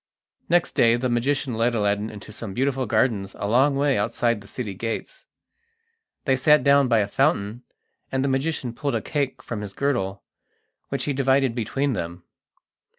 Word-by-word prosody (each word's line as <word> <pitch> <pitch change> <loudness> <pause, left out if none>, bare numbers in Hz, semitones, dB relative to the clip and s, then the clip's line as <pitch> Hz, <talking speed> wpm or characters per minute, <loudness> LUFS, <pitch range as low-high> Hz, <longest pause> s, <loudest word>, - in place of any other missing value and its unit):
Next 175 +1 +3
day 115 0 +4
the 125 +1 -1
magician 135 +2 0
led 115 +2 +1
Aladdin 105 0 0
into 105 0 -10
some 105 -2 -7
beautiful 130 -1 0
gardens 110 -3 +1
a 100 - -3
long 135 +6 +3
way 140 -3 +2
outside 115 +1 0
the 100 - -14
city 105 -4 -5
gates. 115 +4 -5 1.0
They 135 - +3
sat 150 +3 +4
down 140 -1 +5
by 115 -3 +3
a 100 - -1
fountain, 120 -2 0 0.5
and 130 0 0
the - - +1
magician 135 -2 -1
pulled 140 +3 -2
a - - 0
cake 140 -3 -2
from 115 -3 -5
his 100 -2 -6
girdle, 100 -9 -1 0.7
which - - -2
he 145 - -1
divided 135 -1 +2
between 135 +4 -1
them. 85 -3 -5
120 Hz, 170 wpm, -24 LUFS, 105-135 Hz, 1.0 s, down